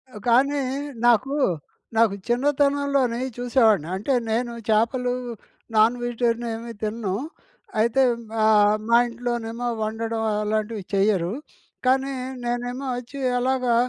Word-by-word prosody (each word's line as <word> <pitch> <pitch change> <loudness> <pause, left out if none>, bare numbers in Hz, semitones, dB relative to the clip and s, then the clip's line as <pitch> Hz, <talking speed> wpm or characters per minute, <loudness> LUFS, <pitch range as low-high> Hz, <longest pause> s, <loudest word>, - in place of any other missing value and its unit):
ఆ! - - -6
కానీ 275 +4 +3 0.5
నాకు 255 +4 +3 0.6
నాకు 220 -3 +4
చిన్నతనంలోనే 280 -1 +1
ఈ - - -5
చూసేవాడిని 225 - +3
అంటే 210 +8 -1 0.2
నేను 235 +1 -1 0.2
చాపలు, 240 +3 +2 0.6
నాన్ 220 +3 +5
వెజిటేరియన్ 240 0 -1
ఏమి 230 +1 -7
తినను. 215 -2 -2 0.7
అయితే 235 +4 +3 0.4
ఆహ్, 210 -1 +5
మా 235 - +6
ఇంట్లోనేమో 235 0 -3 0.2
వండడం 225 +1 -2 0.2
అలాంటివి 215 -1 -2
చెయ్యరు. 195 -2 +2 0.5
కానీ 265 +2 +2 0.3
నేనేమో 245 +2 -3
వచ్చి 250 +3 -8 0.2
అలాగా 255 -1 +1
235 Hz, 110 wpm, -24 LUFS, 220-255 Hz, 0.7 s, మా